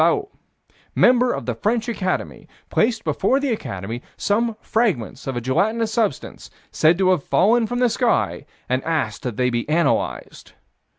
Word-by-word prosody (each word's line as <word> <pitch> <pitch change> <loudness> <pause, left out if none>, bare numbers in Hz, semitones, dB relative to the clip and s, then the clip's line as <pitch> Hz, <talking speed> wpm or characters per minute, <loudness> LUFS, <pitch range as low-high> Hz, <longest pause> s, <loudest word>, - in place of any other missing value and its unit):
Vallot, - - +2 0.7
member 250 0 +4
of - - -4
the - - -1
French 225 +2 -1
Academy, 190 -6 -3 0.2
placed 225 0 +1
before 270 - +1
the 280 -2 -1
Academy 115 - -4 0.2
some 220 +2 0
fragments 170 - -1
of 130 -2 -2
a - - -2
gelatinous 220 - 0
substance, 215 - -2 0.2
said 160 +2 +3
to 185 -1 +3
have 175 -6 +1
fallen 225 +4 +3
from 245 - -3
the 250 0 +3
sky, 235 +1 0 0.2
and 130 +1 -1
asked 150 -10 -2
that 120 -4 -5
they 125 0 +1
be 120 +3 -2
analyzed. 160 -1 -1
205 Hz, 160 wpm, -21 LUFS, -, 0.7 s, member